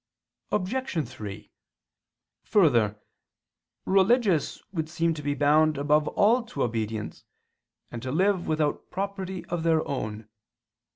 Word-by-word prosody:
Obj. 185 - -1
3: 105 -4 -9 0.9
Further, 120 - +3 0.9
religious 195 - +2
would 160 -4 -3
seem 165 0 0
to 155 - -7
be 145 0 -1
bound 150 +1 +3
above 150 +1 +2
all 230 +5 +3
to 215 - -4
obedience, 110 -2 -3 0.7
and 120 - -6
to 130 +1 -4
live 185 +3 +1
without 155 -2 -1
property 190 -1 -4
of 175 -1 -3
their 160 -1 +2
own. 110 -5 -4
155 Hz, 115 wpm, -27 LUFS, 130-190 Hz, 0.9 s, Further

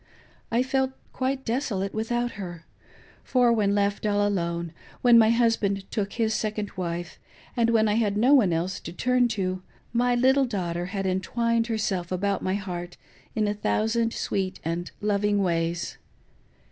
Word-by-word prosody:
I 235 +2 +3
felt 265 0 0 0.2
quite 265 +1 -2
desolate 225 -6 -1
without 240 +2 -1
her; 175 -4 -8 0.6
for 245 -2 +3
when 205 -3 +2
left 200 0 0
all 205 -1 +2
alone, 170 -4 -2 0.3
when 240 -2 +7
my 220 -1 +6
husband 225 -4 +2
took 200 -2 -2
his 225 -2 0
second 210 -1 -2
wife, 175 -2 -4 0.4
and 230 -2 +2
when 220 -1 +4
I 210 - +2
had 210 -2 +1
no 250 +6 +5
one 230 -11 +5
else 170 +3 -1
to 165 - -8
turn 250 +5 +2
to, 185 -5 -2 0.3
my 245 +1 +2
little 265 +2 +4
dafUghter 175 -5 -2
had 195 +1 -3
entwined 230 +5 0
herself 195 -6 -2
about 195 +1 0
my 185 +1 0
heart 175 -3 -5 0.4
in 215 -1 +1
a 205 - +1
thousand 225 +2 0
sweet 190 -4 -2
and 170 +2 -2
loving 205 -1 +2
ways. 170 -1 -1
205 Hz, 160 wpm, -26 LUFS, 185-235 Hz, 0.6 s, when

